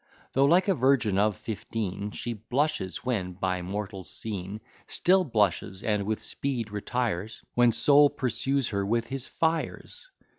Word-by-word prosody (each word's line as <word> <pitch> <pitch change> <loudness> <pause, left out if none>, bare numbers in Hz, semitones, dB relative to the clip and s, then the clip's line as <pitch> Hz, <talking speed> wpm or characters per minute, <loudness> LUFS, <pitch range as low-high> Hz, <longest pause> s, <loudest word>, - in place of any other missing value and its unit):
Though, 135 +1 +4
like 180 +7 +4
a 195 - +4
virgin 125 - +2
of 105 -2 +2
fifteen, 105 -2 -4
She 120 +3 -4
blushes 115 -2 -2
when 100 -8 -1
by 90 0 -2
mortals 95 +1 -5
seen; 105 -1 -5 0.3
Still 185 +1 +3
blushes, 105 - 0
and 105 -2 0
with 110 0 -2
speed 120 -2 -3
retires, 110 -1 -3
When 120 -1 +5
Sol 145 +6 +6
pursues 135 0 -1
her 100 -2 -1
with 115 +3 0
his 135 +1 -3
fires. 165 - -2
110 Hz, 145 wpm, -27 LUFS, 100-135 Hz, 0.3 s, Sol